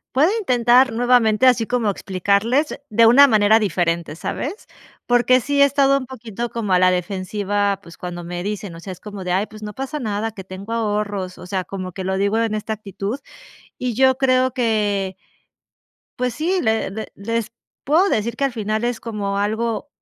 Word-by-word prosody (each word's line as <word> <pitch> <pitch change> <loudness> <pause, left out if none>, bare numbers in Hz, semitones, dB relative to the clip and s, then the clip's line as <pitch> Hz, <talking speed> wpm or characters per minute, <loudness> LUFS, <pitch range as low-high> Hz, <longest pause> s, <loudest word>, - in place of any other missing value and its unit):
Puedo 295 +6 +5
intentar 250 - +4
nuevamente, 240 0 +3
así 245 -3 +4
como 235 -2 0
explicarles 200 - 0
de 230 +2 +4
una 265 +5 +8
manera 215 -2 +4
diferente, 170 -5 -1
¿sabes?, 320 - -5 0.4
porque 245 +1 +4
sí 280 +3 +1
he - - +9
estado 275 0 +3
un 265 - -4
poquito 235 -2 -6
como 225 -4 -3
a 180 - +5
la 185 0 +5
defensiva, 195 +2 -1
pues, 170 - -14
cuando 175 -1 -6
me 175 +1 -5
dicen, 205 -2 -4
o - - -10
sea, 190 - -7
es 180 - -14
como 205 -2 -8
de: 180 - -2
"Ay, 195 +3 +1
pues 215 0 -13
no 210 0 -6
pasa 270 +4 -5
nada, 220 -2 -2
que 195 -3 -9
tengo 190 +3 -9
ahorros", 205 -4 -2
o - - -10
sea, 185 0 -2
como 185 -2 -6
que 190 - -5
lo 190 0 -1
digo 200 +3 +1
en 225 -1 0
esta 215 +1 -3
actitud. 210 +3 -5 0.6
Y 250 -1 -2
yo 260 +1 +4
creo 260 -1 +2
que 205 -6 0 1.0
pues 250 -1 -1
sí, 345 +8 0
le 220 -3 0
le 220 +2 -6
les 230 +2 -3 0.3
puedo 335 +8 +3
decir 225 - -1
que 280 - -3
al 275 - -1
final 215 -1 -2
es 240 -1 -1
como 205 -3 -3
algo 220 +5 -1
220 Hz, 190 wpm, -21 LUFS, 200-250 Hz, 1.0 s, he